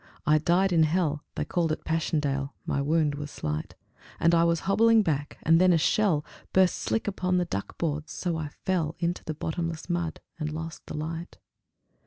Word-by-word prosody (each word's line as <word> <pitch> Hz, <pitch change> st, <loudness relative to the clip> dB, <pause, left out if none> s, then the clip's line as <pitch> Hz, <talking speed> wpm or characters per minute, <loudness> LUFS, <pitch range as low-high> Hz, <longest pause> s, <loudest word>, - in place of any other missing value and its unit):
I 155 Hz, 0 st, +5 dB
died 180 Hz, +4 st, +2 dB
in 165 Hz, -, +5 dB
hell 155 Hz, -2 st, +1 dB
(They -, -, -1 dB
called 170 Hz, -3 st, 0 dB
it 155 Hz, -, -4 dB
Passchendaele); 145 Hz, -4 st, -1 dB
my 140 Hz, -, 0 dB
wound 150 Hz, +1 st, +2 dB
was 145 Hz, 0 st, -5 dB
slight, 75 Hz, -, -4 dB, 0.4 s
And 170 Hz, +1 st, +4 dB
I 165 Hz, 0 st, +5 dB
was 170 Hz, -1 st, +2 dB
hobbling 225 Hz, +3 st, +4 dB
back, 145 Hz, -4 st, -2 dB
and 165 Hz, +2 st, +5 dB
then 185 Hz, 0 st, +6 dB
a 170 Hz, -, +5 dB
shell 165 Hz, -2 st, +2 dB, 0.3 s
Burst 185 Hz, -1 st, +4 dB
slick 225 Hz, -, -1 dB
upon 185 Hz, -2 st, 0 dB
the 180 Hz, -, +1 dB
duck 100 Hz, -10 st, -5 dB
boards; 155 Hz, -1 st, -2 dB
so 175 Hz, -3 st, -2 dB
I 160 Hz, -2 st, -3 dB
fell 165 Hz, -1 st, -2 dB
Into 170 Hz, +1 st, -2 dB
the 155 Hz, -, -4 dB
bottomless 165 Hz, +2 st, -3 dB
mud, 175 Hz, -2 st, -2 dB, 0.2 s
and 155 Hz, -1 st, -2 dB
lost 160 Hz, +1 st, -6 dB
the -, -, -5 dB
light. 165 Hz, +3 st, -5 dB
165 Hz, 190 wpm, -27 LUFS, 150-175 Hz, 0.4 s, then